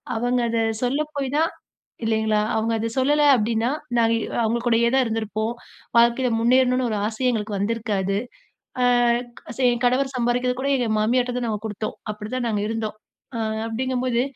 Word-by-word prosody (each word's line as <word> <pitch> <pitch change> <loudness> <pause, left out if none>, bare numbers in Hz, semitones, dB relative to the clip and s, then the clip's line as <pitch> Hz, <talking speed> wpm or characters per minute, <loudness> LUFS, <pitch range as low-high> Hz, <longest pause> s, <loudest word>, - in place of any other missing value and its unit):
அவங்க 245 +2 +1
அத 230 - 0 0.2
சொல்ல 265 +4 +1
போய் 280 -1 -1
தான், 325 +1 +2 0.5
இல்லங்களா 220 -1 +1 0.2
அவங்க 220 +1 0
அத 225 - -1
சொல்லல, 290 +3 +3
அப்பிடீன்னா, 225 +1 0 0.3
நாங்க 230 -1 +3 0.3
அவங்க 225 +2 +1
கூடயே 235 0 +3
தான் 265 0 +4
இருந்துருப்போம். 220 0 -2 0.4
வாழ்க்கையில 235 +2 +4
முன்னேறணும்னு 250 +1 +3
ஒரு 215 - -1
ஆசையே 230 +4 0
எங்களுக்கு 210 -3 -2
வந்திருக்காது. 200 -2 -1 1.4
அ 265 - -2
என் 240 +1 -3
கணவர் 265 +2 +2
சம்பாரிக்குறது 250 +1 0
கூட 275 - 0
எங்க 245 -3 -1
மாமியார்ட்ட 245 +3 +1
தான் 245 - -1
நாங்க 210 -2 -2
குடுத்தோம். 215 0 -4 0.2
அப்டிதான் 225 +4 -4
நாங்க 210 -2 0
இருந்தோம். 225 -1 -3 0.4
அ - - -2 0.3
அப்பிடீங்கம்போது 250 +1 -1
235 Hz, 150 wpm, -23 LUFS, 220-250 Hz, 1.4 s, தான்